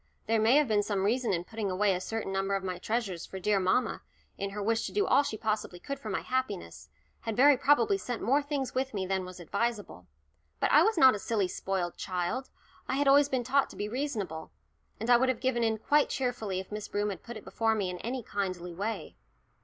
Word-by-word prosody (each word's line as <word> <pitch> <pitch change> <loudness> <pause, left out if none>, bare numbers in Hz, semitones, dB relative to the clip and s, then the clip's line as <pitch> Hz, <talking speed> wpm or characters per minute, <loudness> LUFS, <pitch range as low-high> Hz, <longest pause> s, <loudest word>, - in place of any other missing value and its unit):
There 225 -1 +2
may 225 +4 +5
have 295 -1 +4
been 210 -2 +3
some 200 -2 -1
reason 235 +4 +1
in 175 -2 0
putting 215 +1 -4
away 195 +2 +2
a 180 - -2
certain 220 0 -3
number 195 +1 0
of 195 - -2
my 180 -1 -4
treasures, 205 -5 -2
for 190 - -7
dear 200 +2 +2
mamma, 185 +7 +1 0.3
in 200 - -3
her 205 +1 -5
wish 225 +2 +1
to - - -7
do 410 0 +1
all 285 - +5
she 250 -6 -4
possibly 215 -5 -2
could 275 +9 -5
for 220 - -7
my 195 - -1
happiness, 255 -7 -3 0.3
had 225 -2 -4
very 280 +3 +7
probably 290 - +3
sent 245 -8 -4
more 275 +6 +2
things 285 -2 -3
with 260 -2 -2
me 190 -2 -1
than 190 0 -1
was 180 0 -10
advisable. 205 - -3 0.5
But - - +1
I 300 - +7
was 435 +3 +3
not 265 -4 +8
a 210 - -3
silly 205 -3 0
spoilt 180 -1 -3
child; 185 +8 -3 0.4
I - - -1
had 285 +1 +1
always 285 +1 +6
been 260 -3 0
taught 270 +3 +2
to - - -12
be 205 - -3
reasonable, 210 - -3 0.5
and 225 - -4
I 245 -1 +7
would 260 +2 +2
have 255 -3 0
given 250 -2 0
in 220 -1 +1
quite 290 +7 +2
cheerfully 220 -7 -2
if 190 - -8
Miss 210 0 -5
Broom 205 0 -1
had 195 - -7
put 240 -1 -8
it 215 - -12
before 225 -1 +1
me 195 -4 -1
in 180 - -7
any 245 +1 -4
kindly 185 -4 -3
way. 205 +6 -4
220 Hz, 235 wpm, -30 LUFS, 195-260 Hz, 0.5 s, not